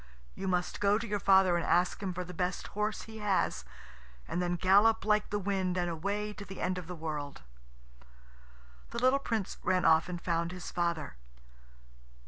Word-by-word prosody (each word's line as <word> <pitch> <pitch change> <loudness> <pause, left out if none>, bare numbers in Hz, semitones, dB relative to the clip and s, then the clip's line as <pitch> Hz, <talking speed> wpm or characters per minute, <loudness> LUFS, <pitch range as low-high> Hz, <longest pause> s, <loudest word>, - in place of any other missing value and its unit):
You 190 - -5
must 180 -1 -1
go 205 0 +3
to 225 - -4
your 205 -1 -1
father 190 -2 +5
and 170 - -1
ask 180 +3 +2
him 195 -2 -2
for 180 0 -4
the 180 0 -9
best 180 +1 -2
horse 210 +1 -2
he 220 -1 -10
has, 195 - 0 0.6
and 175 - -2
then 175 0 0
gallop 205 +5 +4
like 210 0 +2
the 205 - -1
wind, 190 -2 -1
and 175 -1 0
away 200 +6 -2
to 205 - -8
the 195 -2 -9
end 185 0 -1
of 175 - -10
the 180 - -6
world." 150 -3 -5 1.5
The - - -6
little 255 +3 +3
Prince 225 -8 -3
ran 185 -1 +1
off 160 +2 +5
and 175 -1 -4
found 170 0 -1
his 180 - -7
father. 170 - -2
185 Hz, 185 wpm, -31 LUFS, 175-205 Hz, 1.5 s, father